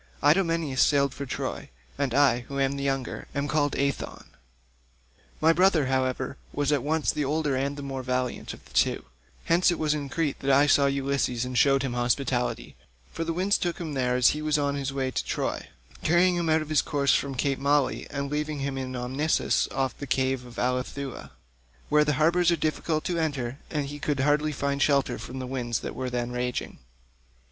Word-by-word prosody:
Idomeneus 160 -3 +2
sailed 140 -2 +3
for 140 - -6
Troy, - - -4 0.3
and 140 -4 -1
I, 140 -4 +4
who 140 0 -4
am 135 0 +2
the 140 - -4
younger, 135 -2 -2
am 140 +1 -1
called 145 -2 +1
Aethon; 140 0 -3 1.1
my 160 +1 +5
brother, 180 -4 +4
however, 130 0 -1
was 145 0 0
at 145 -3 +2
once 155 +3 +1
the 150 - -2
older 145 0 0
and 140 +2 -1
the 145 - -6
more 135 -1 -4
valiant 125 -1 -2
of - - -20
the - - -19
two; - - +2 0.4
hence 170 +3 +4
it 175 - 0
was 155 -1 +1
in 145 -2 -4
Crete 155 -1 -1
that 135 - -2
I 140 +1 +6
saw 140 -1 +4
Ulysses 135 -3 0
and 125 0 -5
showed 135 +1 +4
him 130 -3 -2
hospitality, 120 0 -1 0.4
for 165 - -2
the 165 - -2
winds 185 +4 +1
took 175 -1 -1
him 160 -4 -5
there 125 -2 0
as 125 -1 +5
he 150 - -2
was 155 -1 +1
on 140 -1 0
his 140 -1 -2
way 135 -1 -2
to - - -2
Troy, - - -3 0.3
carrying 175 +2 +3
him 170 -2 -1
out 155 0 +3
of 155 - -12
his 155 -2 +3
course 140 -2 +1
from 140 -1 0
cape 135 +1 0
Malea 140 -1 +1
and 140 -1 -4
leaving 150 -1 -2
him 135 -1 -2
in 130 -1 -4
Amnisus 130 +5 0
off 135 -2 -1
the 140 - -7
cave 130 -1 0
of 120 - -13
Ilithuia, 125 +1 -3 0.6
where 150 0 +5
the 150 0 +1
harbours 170 +5 +3
are 170 - +4
difficult 155 0 -1
to 175 -2 -1
enter 140 -4 -2
and 150 -3 -1
he 145 +1 -7
could 145 -2 -1
hardly 150 +2 +2
find 140 0 -2
shelter 140 -2 +2
from 130 - -7
the 130 - -4
winds 125 -3 -2
that - - -5
were 130 0 -3
then 120 -1 -2
raging. 125 0 -3
140 Hz, 205 wpm, -27 LUFS, 130-150 Hz, 1.1 s, I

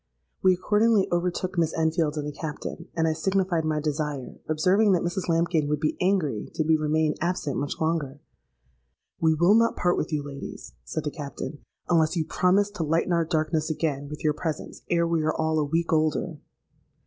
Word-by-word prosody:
We 185 -1 +5
accordingly 210 +2 +3
overtook 180 +1 -1
Miss 165 -1 +1
Enfield 160 -1 +1
and 150 - -2
the 150 - -3
Captain; 160 +3 -6
and 165 -1 +2
I 160 - +2
signified 180 +1 0
my 155 -1 0
desire, 150 -3 -3
observing 190 +6 +3
that 180 - +2
Mrs 175 +1 -2
Lambkin 165 -2 +2
would 150 -1 0
be 155 - 0
angry 180 - 0
did 155 - 0
we 160 - +5
remain 155 0 +1
absent 170 -5 -1
much 145 0 -3
longer. 160 -4 -1 1.0
'We 160 -1 +3
will 175 +5 +5
not 230 +1 +4
part 175 0 +1
with - - -2
you, 150 -2 -1
ladies,' 140 -1 -8
said 155 - -4
the 150 - -2
Captain, 145 0 -6 0.3
'unless 160 -1 +3
you 160 -2 0
promise 200 +5 +2
to 190 -5 -3
lighten 165 +3 +1
our 170 -1 +2
darkness 155 -1 0
again 145 -3 -1
with 150 - -8
your 155 -1 +3
presence 155 0 -5
ere 170 -1 +2
we 165 -1 +1
are 155 0 0
all 160 0 +1
a 150 - +1
week 165 +3 0
older.' 155 0 0
160 Hz, 190 wpm, -26 LUFS, 150-175 Hz, 1.0 s, We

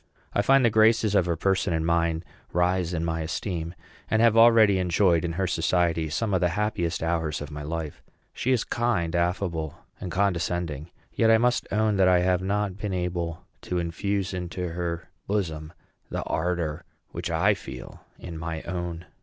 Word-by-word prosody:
I - - +2
find 135 +4 +4
the 115 - +4
graces 110 -1 +4
of 95 -4 +3
her 85 - +1
person 95 +1 +1
and 80 0 0
mind 85 0 +1 0.3
rise 90 0 +1
in 85 -2 -2
my 80 0 -1
esteem, 85 +1 -4 0.3
and 110 - +2
have 115 -1 +5
already 115 -4 +6
enjoyed 90 -1 +2
in 85 -1 -2
her 95 +3 -1
society 85 -2 +1
some 105 +7 -1
of 95 - +2
the 90 - +3
happiest 85 -6 -1
hours 80 -2 -1
of 75 +1 -7
my 75 0 -6
life. 80 0 -5 0.3
She 130 - -1
is 125 -3 +2
kind, 100 -9 0
affable, 85 -3 -1 0.2
and 90 - -5
condescending; 85 -5 -1 0.2
yet 115 - +3
I 115 - +7
must 120 +2 +1
own 110 0 +2
that 95 -1 +5
I 90 -1 +5
have 90 0 +2
not 100 0 -1
been 105 -2 -3
able 90 -1 -3 0.2
to 90 - -3
infuse 95 +3 -2
into 90 0 -4
her 85 0 -4 0.2
bosom 80 -7 -2 0.4
the - - -3
ardor 80 -2 -2 0.3
which - - -5
I 90 +6 +3
feel 65 -9 -9
in 85 -3 -8
my 80 -1 -4
own. 85 -2 -4
90 Hz, 180 wpm, -26 LUFS, 85-100 Hz, 0.4 s, I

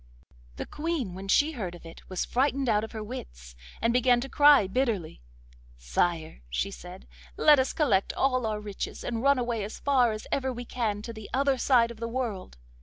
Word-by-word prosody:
The - - -5
Queen, 300 - -3
when 190 +2 -8
she 290 +10 +3
heard 190 - -5
of 170 - -14
it, 165 - -13
was 185 -1 -2
frightened 270 +1 0
out 215 -2 +2
of 220 - -6
her 220 -1 -6
wits, 60 - -9 0.2
and 230 +1 +1
began 250 0 +4
to 270 - -5
cry 290 -6 +6
bitterly. 195 - -2 0.6
'Sire,' 110 - -1
she - - -2
said, - - -11 0.3
'let 295 -2 +6
us 260 - +1
collect 235 -11 +1
all 255 -3 +1
our 215 -1 -2
riches 205 -2 -6
and 230 -2 -3
run 280 +1 +4
away 235 -3 -1
as 210 - -6
far 255 -5 +3
as 215 0 -6
ever 265 -1 0
we 245 0 -6
can, 215 -4 -2
to 230 - -6
the 220 -2 -10
other 275 -1 +2
side 235 -2 +3
of 235 - -11
the 230 - -3
world. 230 - -4
230 Hz, 200 wpm, -28 LUFS, 195-260 Hz, 0.6 s, cry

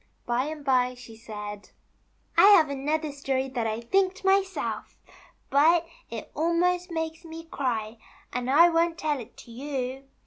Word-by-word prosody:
By 245 +2 0
and 300 -1 -6
by 255 -2 +2
she 245 -2 -12
said: 210 -2 -8 0.7
I - - +8
have 310 -5 +4
another 300 +3 -1
story 270 -2 -2
that 240 -3 -2
I 220 +1 -3
thinked 385 - 0
myself, 385 0 0 0.6
but 320 +5 +5 0.2
it 225 -2 -7
almost 350 +3 +1
makes 320 0 -4
me 325 0 -9
cry, 230 -7 -3 0.3
and 250 +1 -2
I 320 +6 +7
won't 335 0 +1
tell 300 -3 -1
it 230 - -11
to 235 - -13
you. 265 +1 -4
285 Hz, 150 wpm, -27 LUFS, 250-330 Hz, 0.7 s, I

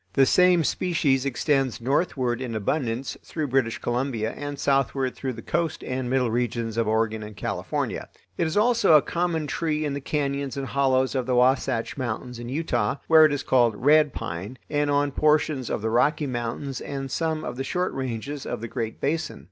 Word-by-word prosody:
The 135 - +5
same 180 +3 +5
species 145 -6 +1
extends 135 0 0
northward 130 -2 0
in 120 -3 -4
abundance 120 +3 -2
through 155 -3 -4
British 125 -3 +1
Columbia 120 -2 -1
and 145 +1 -6
southward 135 -2 +1
through 130 -2 -3
the 115 - -9
coast 170 -1 -1
and 130 -1 -3
middle 125 -3 +1
regions 115 -1 -1
of 115 -1 0
Oregon 110 0 0
and 105 -1 -9
California. - - -3 0.3
It 170 - 0
is 160 - -2
also 225 -4 +4
a 150 - +6
common 170 -2 -1
tree 155 +1 -1
in 145 - -2
the 140 - -4
cañons 140 -2 -2
and 135 - -2
hollows 130 -1 +1
of 130 -2 -1
the 125 - +1
Wahsatch 125 -2 +2
Mountains 125 -1 -4
in 120 0 -6
Utah, 125 -6 0
where 160 -1 +7
it 155 - +3
is 145 - -2
called 120 -4 +3
"red 150 +5 +4
pine" 95 +8 -6
and 145 0 +1
on 145 0 +2
portions 150 -3 +1
of 105 - -2
the 110 - 0
Rocky 150 +6 +2
Mountains 125 +1 -4
and 135 -1 -5
some 160 0 -1
of 120 - -4
the 135 - -3
short 180 +6 -1
ranges 130 +2 -4
of - - -4
the 115 - -5
Great 110 0 -4
Basin. 160 - -2
135 Hz, 190 wpm, -25 LUFS, 120-150 Hz, 0.3 s, where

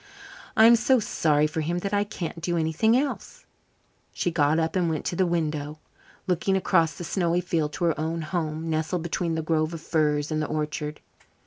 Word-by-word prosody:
"I'm 225 +2 +8
so 245 +3 +3
sorry 150 -7 +1
for 155 +1 -2
him 170 +3 -1
that 195 +3 -3
I 205 0 +3
can't 170 -5 -6
do 175 +1 -1
anything 165 +9 +2
else." 280 +1 -4 0.7
She 175 - -1
got 155 -1 +2
up 165 +1 0
and 180 -3 +1
went 155 -2 -3
to - - -2
the 185 +1 +2
window, 155 -3 -2 0.5
looking 185 +2 +1
across 165 -5 +2
the - - -6
snowy 175 0 0
field 160 -4 -1
to - - -4
her 165 -2 +1
own 160 +1 -2
home, 160 -1 -3
nestled 160 +2 -1
between 170 0 -2
the 160 - -2
grove 155 +1 0
of 160 - -8
firs 150 -2 0
and 155 0 0
the 150 - -2
orchard. 150 0 -3
165 Hz, 195 wpm, -26 LUFS, 155-175 Hz, 0.7 s, I'm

